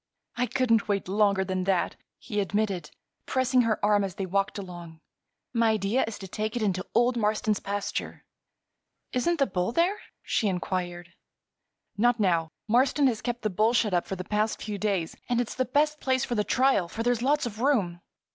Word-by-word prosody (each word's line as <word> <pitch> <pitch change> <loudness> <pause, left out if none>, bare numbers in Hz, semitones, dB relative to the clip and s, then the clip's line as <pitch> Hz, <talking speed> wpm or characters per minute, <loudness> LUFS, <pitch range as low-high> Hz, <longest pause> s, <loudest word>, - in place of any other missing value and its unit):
"I 250 0 0
couldn't 230 -5 +2
wait 200 -3 -1
longer 200 -1 +2
than 185 -1 -2
that," 190 -2 +1 0.2
he 210 -4 -4
admitted, 200 -4 -1 0.4
pressing 260 -1 +3
her 230 -3 +1
arm 205 -1 +3
as 190 -2 -4
they 195 - -3
walked 195 +3 0
along. 175 -4 -8 0.5
"My 230 -2 +3
idea 215 +5 +1
is 225 - -5
to 195 - -8
take 215 +4 -3
it 240 - -1
into 185 -3 -1
old 240 +2 +4
Marston's 215 -1 +1
pasture." 200 0 -4 0.9
"Isn't 335 +7 +1
the 275 - +3
bull 185 -2 -1
there?" 350 - +1 0.2
she 220 - 0
inquired. 175 -2 -3 0.8
"Not 240 +2 +3
now. 170 -5 +2 0.2
Marston 260 +5 +3
has 240 -5 +1
kept 240 -2 -3
the 215 - 0
bull 215 +5 +2
shut 215 -5 +2
up 175 - +1
the 195 - -4
past 210 +3 -1
few 210 -2 -5
days. 195 -6 -1
And 240 -1 +2
it's 245 - -2
the 255 - 0
best 300 +3 +1
place 260 -1 +1
for - - -3
the 210 -3 +1
trial, 255 -7 +2
for 225 +6 -4
there's 245 -1 +1
lots 290 +3 +2
of 220 -2 -6
room." 200 -11 +1
215 Hz, 185 wpm, -27 LUFS, 190-245 Hz, 0.9 s, old